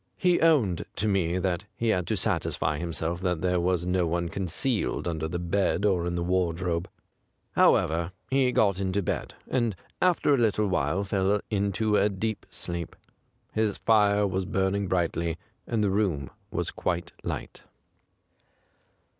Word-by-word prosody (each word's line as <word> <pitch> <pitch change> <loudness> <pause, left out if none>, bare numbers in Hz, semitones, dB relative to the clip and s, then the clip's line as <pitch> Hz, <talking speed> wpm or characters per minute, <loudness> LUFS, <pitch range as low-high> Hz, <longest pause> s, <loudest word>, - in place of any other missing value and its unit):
He 180 -1 +3
owned 135 - +3
to 110 - -1
me 90 -4 +1
that 90 0 -1
he 115 - 0
had 90 -5 +1
to - - 0
satisfy 75 0 0
himself 85 +1 -3
that 90 -4 0
there 90 -1 +1
was 90 0 +1
no 90 -1 +1
one 85 +1 -1
concealed 95 +5 -1
under 80 -2 -2
the 85 +2 -3
bed 95 +4 0
or 90 -4 +2
in 85 - -2
the 85 - -1
Avardrobe. 90 -1 0 0.6
How - - +6
ever, 85 +2 0 0.2
he 130 -1 +3
got 100 -6 +2
into 100 +1 0
bed, - - -3
and 120 -6 0 0.3
after 175 -5 +3
a 135 - +3
little 105 -2 +2
while 90 +1 0
fell 100 +1 +1
into 105 +1 +1
a 105 - +3
deep 105 +2 -3
sleep; 85 -2 -5 0.6
his 110 -2 0
fire 105 -2 +3
was 95 -1 -1
burning 95 +1 0
brightly, 85 -2 0 0.3
and 110 -2 0
the 100 - +2
room 95 -10 0 0.2
was - - -2
quite 85 -1 -2
light. - - -5
95 Hz, 155 wpm, -27 LUFS, 85-105 Hz, 0.6 s, How